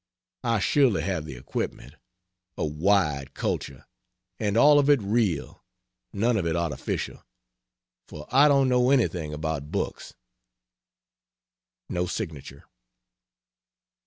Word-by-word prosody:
I 115 -2 +1
surely 125 +1 +2
have 90 -6 -2
the 70 -4 -8
equipment, 65 +1 -5 0.6
a - - -1
wide 75 -3 0
culture, 65 -2 -4 0.5
and 105 0 0
all 145 +4 +7
of 145 0 +2
it 145 -2 +6
real, 100 -6 -1 0.5
none 115 +3 +1
of 90 -5 -1
it 80 - 0
artificial, 85 -3 -3 0.8
for 75 -1 -10
I 140 +3 +6
don't 140 -2 +4
know 125 0 +3
anything 90 - +1
about 75 -1 -4
books. - - -4 1.7
[No 90 0 -2
signature. 75 -8 -6
95 Hz, 110 wpm, -26 LUFS, 75-120 Hz, 1.7 s, all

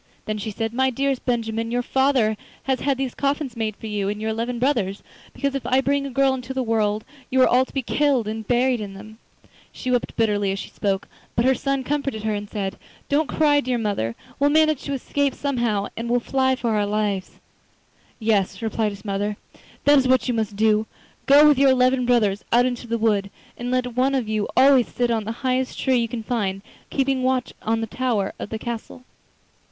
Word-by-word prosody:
Then 215 0 -3
she 215 - -4
said: 225 +2 -3
'My 265 +2 +2
dearest 270 +1 -1
Benjamin, 230 -2 -1
your 245 +1 0
father 265 -5 +2 0.3
has 265 -1 0
had 275 -2 0
these 265 -2 -2
coffins 280 -2 -1
made 220 -2 -2
for - - -11
you 205 -2 -2
and 210 +1 -3
your 220 +1 -2
eleven 235 +2 -2
brothers, 230 -7 0 0.3
because 280 -1 -2
if 275 - -3
I 260 +1 +2
bring 280 +1 0
a - - -5
girl 270 +1 +2
into 260 0 -5
the 260 - 0
world 215 -2 0 0.2
you 260 - +1
are - - +6
all 255 +1 +4
to - - -17
be 270 - -1
killed 270 -3 +1
and 220 -1 -5
buried 245 -1 +2
in 200 -2 -6
them.' 215 +3 -12 0.5
She 255 - -4
wept 245 -1 0
bitterly 205 -3 +1
as 195 - -2
she - - -7
spoke, 195 -1 -1 0.3
but 230 - +2
her 265 - +5
son 275 0 -1
comforted 275 -5 -2
her 220 -1 0
and 205 0 -4
said: 195 -3 -4 0.3
'Don't 290 +1 +2
cry, 295 -2 +3
dear 255 -3 -1
mother; 200 - -1 0.2
we'll 285 +1 +4
manage 310 -1 +3
to 280 - -2
escape 280 +1 -1
somehow, 235 -8 0
and 235 +1 -4
will 245 +1 +3
fly 260 +1 +1
for 240 -3 -2
our 210 -1 +1
lives.' 205 -2 -2 0.8
'Yes,' 200 -4 +1
replied 220 -1 0
his 200 +2 -13
mother, 205 +1 -2 0.5
'that 290 0 +6
is 260 - +1
what 255 -2 +3
you 250 - +1
must 220 -3 -2
do—go 220 +7 +3
with 290 -3 +5
your 275 -1 +6
eleven 255 -1 +3
brothers 210 -5 +2
out 245 +1 +5
into 245 -1 -3
the 230 0 -1
wood, 210 -3 +1 0.3
and 245 +1 -5
let 250 -1 -1
one 265 +2 +2
of 250 -5 -1
you 215 -1 -1
always 265 -2 +6
sit 245 -1 -1
on 220 -2 0
the 220 - -3
highest 255 0 0
tree 260 -1 +2
you 235 -1 +1
can 230 0 -5
find, 200 -5 -2 0.3
keeping 270 -1 0
watch 255 -1 0
on 225 +1 0
the - - -1
tower 225 -4 -1
of - - -5
the 220 - -3
castle. 235 +2 -6
240 Hz, 215 wpm, -23 LUFS, 215-265 Hz, 0.8 s, are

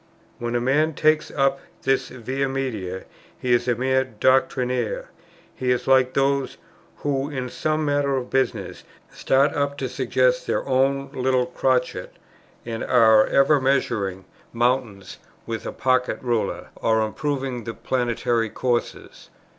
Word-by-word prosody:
"When 120 0 -3
a - - +2
man 145 +5 +1
takes 155 0 +2
up 135 -1 +1 0.2
this 135 -1 +1
Via 130 +3 -3
Media, 110 -9 -3 0.3
he 125 -1 0
is 120 +1 +2
a 120 - +2
mere 130 +2 +1
doctrinaire;" 130 - 0 0.4
he 130 - -3
is 125 -1 +1
like 130 -1 +4
those, 135 0 +1 0.5
"who, 140 0 0
in 130 -3 -4
some 155 +4 -1
matter 145 -1 +1
of 125 -1 -5
business, 135 0 -1 0.3
start 135 +2 +2
up 140 -1 -1
to - - -2
suggest - - +1
their - - -1
own 135 +1 +1
little 130 -2 +1
crotchet, 125 0 -1 0.5
and 115 -1 -4
are 110 -3 +5
ever 140 +1 +4
measuring 105 -8 0 0.3
mountains 120 -4 -1 0.3
with 115 -1 -5
a - - -3
pocket 130 -1 +1
ruler, 120 -3 -2
or 110 0 +2
improving 130 +1 -3
the 115 - -5
planetary 120 -2 -1
courses." 120 +1 -3
130 Hz, 140 wpm, -23 LUFS, 120-135 Hz, 0.5 s, are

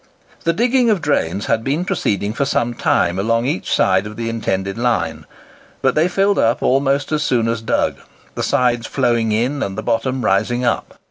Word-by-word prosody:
The 165 - +4
digging 245 +4 +2
of 210 -4 +2
drains 105 - -1
had 110 - 0
been 145 +8 -1
proceeding 105 - -1
for 140 - -1
some 120 -3 0
time 90 -5 +1
along 115 +3 +1
each 130 -8 -2
side 95 +2 +2
of 105 - -9
the 115 0 -3
intended 95 -4 -2
line; 120 0 -1 0.6
but 130 -1 +3
they 155 +3 +3
filled 195 +2 +1
up 115 +1 +1
almost 135 +1 +1
as 155 -1 +1
soon 120 -6 +1
as 115 -1 -1
dug, 115 - 0 0.4
the - - -4
sides 120 -2 +1
flowing 120 -4 +1
in, 125 +6 0
and 95 -1 -3
the - - -4
bottom 120 +2 -1
rising 120 +6 +1
up. 120 - -1
120 Hz, 190 wpm, -19 LUFS, 110-140 Hz, 0.6 s, The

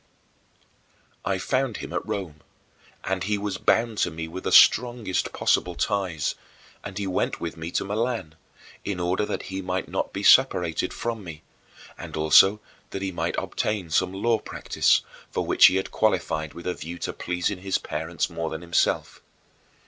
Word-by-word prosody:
I 100 -1 0
found 130 +5 -1
him - - -7
at - - -1
Rome, 95 -8 -5 0.6
and 95 -1 -2
he 105 +2 0
was 100 -2 -3
bound 115 -2 +2
to - - +2
me 80 0 -6
with 90 +3 -8
the - - 0
strongest 120 -5 +4
possible 90 -1 +1
ties, 95 -8 -1 0.5
and 95 -1 -7
he 100 - -2
went 95 -1 -1
with 85 - -4
me 80 +1 -6
to 85 - -1
Milan, 105 -5 -2 0.5
in 100 -3 -3
order 90 +4 0
that - - -3
he 95 - -2
might 95 0 -3
not - - -2
be - - -5
separated 85 -3 +4
from 115 -3 -4
me, 80 -3 -9 0.6
and - - -7
also 95 +7 +6 0.3
that 95 - -5
he 95 - -2
might 85 - -2
obtain 100 -6 -2
some 90 +3 +2
law 110 +4 +1
practice, - - +1 0.3
for - - -2
which - - +7
he 95 - +2
had 95 - -1
qualified 80 -8 0
with 85 - -9
a 90 - 0
view 85 +3 -7
to - - -4
pleasing 90 +2 -2
his 95 0 0
parents 80 +1 -3
more 80 -1 -4
than 80 +1 -6
himself. 85 -2 0
95 Hz, 170 wpm, -25 LUFS, 85-105 Hz, 0.6 s, which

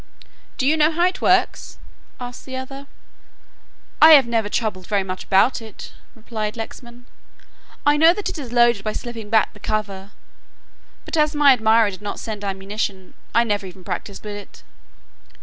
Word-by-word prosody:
"Do 260 - -1
you 305 +3 +3
know 305 0 +4
how 345 +2 +1
it 365 +1 -1
works?" - - +1 0.4
asked 245 0 -8
the 260 - -6
other. 270 +2 -7 1.1
"I 315 +1 +10
have 280 -4 +7
never 225 -3 -1
troubled 205 -5 -3
very 200 -2 0
much 185 0 -6
about 215 +6 +3
it," 220 -3 -11 0.2
replied 220 -1 -5
Lexman, 240 +2 -9 0.8
"I 290 0 +4
know 325 +2 +7
that 405 +3 -4
it - - -4
is 255 -5 -7
loaded 235 -4 +3
by 215 - -2
slipping 230 -3 -7
back 220 0 +2
the - - -16
cover, 200 -2 -4 1.0
but - - -4
as 305 0 +2
my 290 -2 +6
admirer 220 -2 +3
did 185 - -11
not 205 - -5
send 215 -2 -6
ammunition, 195 -1 -4 0.2
I 235 - +5
never 205 -3 -2
even 185 0 -13
practised 190 +2 -6
with 205 -1 -5
it." 205 - -13
225 Hz, 170 wpm, -21 LUFS, 205-260 Hz, 1.1 s, I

